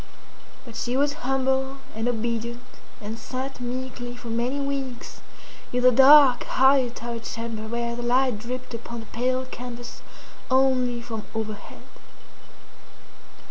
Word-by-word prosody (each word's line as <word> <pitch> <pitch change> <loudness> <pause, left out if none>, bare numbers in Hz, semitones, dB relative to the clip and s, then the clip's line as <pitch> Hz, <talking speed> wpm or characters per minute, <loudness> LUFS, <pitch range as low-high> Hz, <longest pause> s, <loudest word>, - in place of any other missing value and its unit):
But 235 -2 -11
she 245 +2 -1
was 285 +1 +2 0.2
humble 265 0 +1 0.2
and 225 +2 -2
obedient, 235 +1 -2 0.4
and 220 +1 -6
sat 260 0 -5
meekly 245 0 -4
for 240 - -8
many 240 +5 -1
weeks 275 -3 -4 0.5
in 250 0 0
the 255 - +8
dark, 270 0 +8
high 265 0 +4
turret 235 -1 -6
chamber 230 -1 -4
where 235 +1 -2
the 240 - -5
light 245 -1 +2
dripped 250 +3 -6
upon 235 0 -6
the - - -11
pale 255 +3 -1
canvas 245 -1 -8 0.5
only 255 -2 +2
from 225 -3 -6
overhead. 215 -2 -5
245 Hz, 130 wpm, -25 LUFS, 235-260 Hz, 0.5 s, the